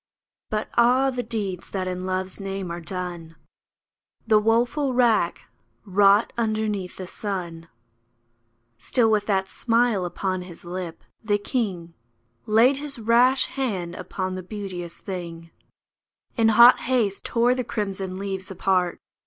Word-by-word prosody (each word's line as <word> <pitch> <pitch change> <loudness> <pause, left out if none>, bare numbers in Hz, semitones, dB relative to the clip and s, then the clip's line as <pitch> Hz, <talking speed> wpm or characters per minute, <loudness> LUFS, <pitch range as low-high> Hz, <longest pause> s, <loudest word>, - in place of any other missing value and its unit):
But 215 0 -2
ah! 255 +3 +4
the 250 -1 -2
deeds 210 -6 -4
that 190 -2 -3
in 185 0 -4
Love's 185 +1 -3
name 195 -2 -4
are 170 0 -5
done! 175 -2 -6 0.9
The 220 -2 +5
woeful 240 +5 +1
wrack 230 -8 +2 0.4
wrought 200 +2 +4
underneath 215 -4 -2
the 185 - -6
sun! 175 -4 -5 1.1
Still 225 - +2
with 210 -1 +1
that 190 -2 +1
smile 230 -2 +1
upon 185 +1 -2
his 180 -1 -11
lip, 175 -1 -6 0.2
the 205 -2 +2
king 195 -6 -3 0.5
Laid 230 +6 +4
his 285 -1 -3
rash 240 +4 +4
hand 195 -11 -3
upon 185 +1 -4
the 185 - -4
beauteous 185 -3 -7
thing; 170 -3 -7 0.8
In 225 -2 +3
hot 235 +3 +8
haste 230 -6 0
tore 240 +1 +2
the 255 0 -2
crimson 195 -4 -4
leaves 190 -1 -4
apart. 185 -1 0
200 Hz, 130 wpm, -24 LUFS, 185-230 Hz, 1.1 s, hot